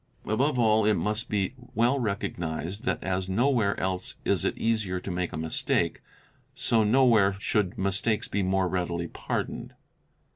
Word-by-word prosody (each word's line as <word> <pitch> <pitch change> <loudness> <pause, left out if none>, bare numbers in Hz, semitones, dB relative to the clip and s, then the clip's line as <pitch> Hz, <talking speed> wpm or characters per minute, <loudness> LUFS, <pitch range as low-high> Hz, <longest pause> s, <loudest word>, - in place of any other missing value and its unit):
Above 130 +6 +1
all 110 -2 +4
it 105 0 +4
must 110 +3 -2
be 100 +1 0 0.2
well 120 +5 +3
recognised, 100 -2 -3
that - - -1
as 95 0 -1
nowhere 115 0 +2
else 95 0 -2
is - - +1
it - - -1
easier 110 -5 0
to 95 - -6
make 90 0 -2
a 85 - -5
mistake, 80 0 0
_ - - -34 0.5
so 115 -2 +2
nowhere 110 -4 +4
should 100 -2 0
mistakes 100 +3 0
be 100 - -1
more 95 0 +1
readily 85 -2 -2
pardoned. - - -4
100 Hz, 155 wpm, -27 LUFS, 95-115 Hz, 0.5 s, all